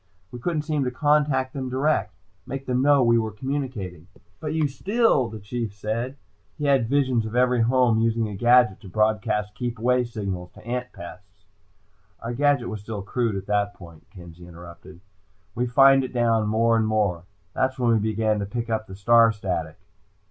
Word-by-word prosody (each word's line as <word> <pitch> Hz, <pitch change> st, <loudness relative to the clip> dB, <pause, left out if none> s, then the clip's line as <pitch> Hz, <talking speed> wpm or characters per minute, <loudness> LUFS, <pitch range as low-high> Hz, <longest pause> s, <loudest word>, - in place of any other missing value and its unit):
We 125 Hz, -, -8 dB
couldn't 155 Hz, +2 st, -2 dB
seem 150 Hz, -2 st, -1 dB
to -, -, 0 dB
contact 145 Hz, -1 st, +1 dB
them 130 Hz, -2 st, -4 dB
direct 130 Hz, -6 st, 0 dB, 0.3 s
make 135 Hz, +1 st, -5 dB
them 125 Hz, 0 st, 0 dB
know 140 Hz, -1 st, +4 dB
we 115 Hz, -1 st, +4 dB
were 110 Hz, -1 st, -2 dB
communicating." 105 Hz, -, -5 dB, 0.3 s
"But 155 Hz, 0 st, -4 dB
you 155 Hz, -2 st, +2 dB
still 190 Hz, -, +1 dB
" -, -, -9 dB
the 110 Hz, -, -8 dB
Chief 105 Hz, +1 st, -5 dB
said. 115 Hz, +7 st, -4 dB, 0.4 s
He 150 Hz, -, -3 dB
had 135 Hz, -5 st, +2 dB
visions 130 Hz, -4 st, +1 dB
of 110 Hz, -, -7 dB
every 125 Hz, -1 st, +3 dB
home 120 Hz, -1 st, +3 dB
using 115 Hz, 0 st, +1 dB
a 105 Hz, -, -6 dB
gadget 120 Hz, -1 st, +4 dB
to 95 Hz, -, -12 dB
broadcast 105 Hz, +1 st, 0 dB
"keep 120 Hz, +3 st, -4 dB
away" 125 Hz, +2 st, +2 dB
signals 100 Hz, -6 st, -5 dB
to -, -, -16 dB
ant 125 Hz, +1 st, -4 dB
pests. 90 Hz, +2 st, -13 dB, 0.7 s
"Our 115 Hz, +1 st, -5 dB
gadget 140 Hz, -1 st, +1 dB
was 110 Hz, -2 st, -6 dB
still 105 Hz, -2 st, -6 dB
crude 115 Hz, 0 st, -1 dB
at 95 Hz, 0 st, -5 dB
that 100 Hz, 0 st, 0 dB
point," 85 Hz, -3 st, -15 dB
Kenzie 85 Hz, -2 st, -13 dB
interrupted. 85 Hz, +1 st, -13 dB, 0.5 s
"We 125 Hz, +1 st, -1 dB
fined 135 Hz, +2 st, +5 dB
it 130 Hz, -, -6 dB
down, 115 Hz, -3 st, +2 dB
more 115 Hz, +2 st, +2 dB
and 110 Hz, -1 st, +1 dB
more. 100 Hz, -6 st, 0 dB, 0.3 s
That's 130 Hz, 0 st, 0 dB
when 120 Hz, -2 st, +2 dB
we 110 Hz, -, +3 dB
began 110 Hz, 0 st, 0 dB
to 100 Hz, -, -3 dB
pick 115 Hz, +2 st, -4 dB
up 110 Hz, 0 st, -2 dB
the 95 Hz, -, -9 dB
star 115 Hz, +3 st, +5 dB
static." 90 Hz, -7 st, -4 dB
115 Hz, 190 wpm, -24 LUFS, 105-130 Hz, 0.7 s, fined